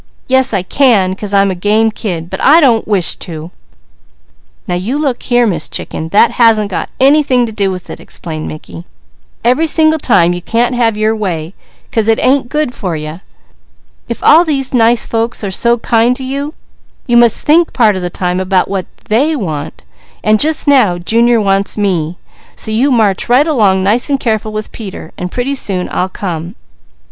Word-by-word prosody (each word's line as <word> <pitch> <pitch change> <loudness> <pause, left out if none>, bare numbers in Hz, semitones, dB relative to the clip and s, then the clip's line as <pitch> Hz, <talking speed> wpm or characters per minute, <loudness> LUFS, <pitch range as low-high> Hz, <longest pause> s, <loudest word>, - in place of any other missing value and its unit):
"Yes 260 0 +3
I 195 -4 -1
can, 205 -5 +2
'cause 205 0 -6
I'm 200 -1 +3
a - - -1
game 210 +5 +1
kid; 175 -7 -4
but 190 - -5
I 305 +5 +6
don't 240 -8 +2
wish 195 -5 +2
to!" 165 0 -8 1.2
"Now - - -2
you 195 +10 -2
look 280 -5 -2
here, 245 -1 +2
Miss 170 -8 -2
Chicken, 160 - -5
that 210 +5 +4
hasn't 215 -3 +3
got - - -3
anything 270 -2 +3
to 225 - -6
do 205 -2 -1
with 185 -1 -6
it," - - -9
explained 155 -2 -7
Mickey. 85 - -9 0.6
"Every 255 +8 +2
single 315 0 +2
time 175 - +3
you 175 - -5
can't 235 +6 0
have 230 -3 +1
your 215 +1 +1
way, 175 -5 -4 0.4
'cause 225 -2 0
it 225 - +3
ain't 260 -1 +1
good 300 -4 -1
for 180 -8 -4
you. 155 +3 -7 0.9
If 235 - -5
all 325 +3 +6
these 275 -6 -2
nice 235 -1 +3
folks 230 0 -2
are 200 - -3
so 235 +5 +1
kind 235 +1 +1
to 265 - -7
you, 280 +4 -4 0.5
you 240 - 0
must 235 -2 +4
think 325 +3 +3
part 220 -5 +2
of 185 - -4
the 180 - -3
time 180 +1 -2
about 185 -1 +1
what 195 -2 -4 0.2
they 280 +9 +1
want, 155 - -5 0.4
and 215 0 +3
just 310 +3 0
now 245 -11 +4
Junior 230 +6 +2
wants 195 -1 0
me, 180 -5 -1 0.4
so 220 - -2
you 240 +6 +2
march 220 -7 +1
right 255 +4 +4
along 205 - +2
nice 220 +8 +1
and 275 -1 0
careful 220 -3 -2
with 215 0 -5
Peter, 195 -7 -9
and 180 0 -6
pretty 250 +3 -2
soon 195 -9 -2
I'll 185 - -1
come." 175 -1 -5
220 Hz, 190 wpm, -13 LUFS, 185-250 Hz, 1.2 s, I